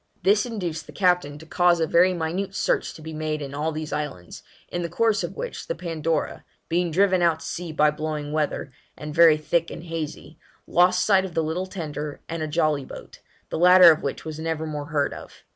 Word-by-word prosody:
This 205 +5 +3
induced 175 -9 -4
the - - -12
captain 180 -6 +1
to 160 - -13
cause 175 +1 +3
a 160 - +2
very 175 +4 +4
minute 180 +3 -3
search - - 0
to 155 - -12
be 160 0 -7
made 155 0 -3
in 140 -2 -6
all 150 +3 -1
these 155 0 -5
islands, 140 - -5 0.3
in 175 - -4
the 170 - -3
course 220 -2 +1
of 175 +3 -5
which - - -6
the - - -2
Pandora, 165 -2 -2 0.3
being 175 +1 +1
driven 185 +2 +3
out 165 -2 +2
to - - -9
sea 175 -1 -5
by 150 -1 +3
blowing 150 -1 -4
weather, 150 -2 -2 0.3
and 150 0 -7
very 165 -1 +6
thick 165 +2 0
and - - -8
hazy, 165 -2 -6 0.3
lost 180 +1 +3
sight 195 -2 +4
of 185 -3 -7
the 165 - +1
little 170 +4 -2
tender 150 -6 -6
and 165 -1 -4
a 155 - -2
jolly 150 -2 +1
boat, - - -11 0.3
the - - -3
latter 180 0 +9
of 155 - 0
which 140 - -4
was 155 -1 -6
never 160 -1 -2
more 150 -2 -4
heard 145 -2 0
of. - - -12
160 Hz, 215 wpm, -24 LUFS, 155-180 Hz, 0.3 s, latter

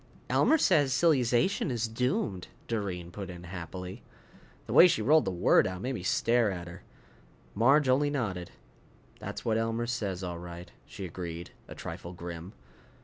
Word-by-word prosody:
"Elmer 320 - +4
says 155 - +3
silly 155 -1 +4
zation 120 - +1
is 120 -2 -1
doomed!" 115 - -1 0.2
Doreen 95 -6 -3
put 95 +1 -7
in 90 -1 -9
happily. 90 +1 -7 0.6
The - - -5
way 180 - +9
she 170 - +1
rolled 155 +6 +5
the - - -1
word 90 - +4
out 95 0 -5
made 130 +2 -1
me 110 - -4
stare 115 +5 +2
at 90 -3 -5
her. 90 +2 -10 0.7
Marge 135 +7 +4
only 140 +3 +3
nodded. 100 -11 -3 0.7
"That's - - -6
what 110 -1 +2
Elmer 115 +1 -1
says, 100 -6 -3
all 85 -2 -4
right," 85 0 -9 0.2
she 95 - -7
agreed, 85 -1 -6 0.2
a - - -9
trifle 85 +1 -7
grim. 85 +1 -8
100 Hz, 165 wpm, -29 LUFS, 90-125 Hz, 0.7 s, way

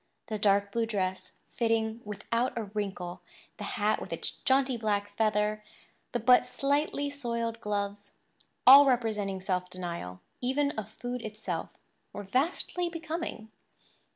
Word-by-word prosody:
The 215 -1 -2
dark 200 0 +3
blue 230 +1 0
dress, 185 -3 -2 0.2
fitting 225 -1 0
without 230 +5 -2
a 230 - -1
wrinkle, 195 -4 -4 0.4
the - - -5
hat 215 0 +2
with - - -7
its - - -3
jaunty 265 -1 +3
black 205 -2 -1
feather, 215 -1 +1 0.5
the 240 - 0
but 250 +2 +6
slightly 285 +2 0
soiled 235 -4 -3
gloves—all 205 +6 +3
representing 215 -6 +1
self 180 -1 -1
denial, 170 - -6 0.2
even 280 +3 +1
of 215 -4 -5
food 245 +2 -5
itself—were 215 -1 -7
vastly 315 - 0
becoming. 325 -9 -5
220 Hz, 125 wpm, -30 LUFS, 205-250 Hz, 0.5 s, but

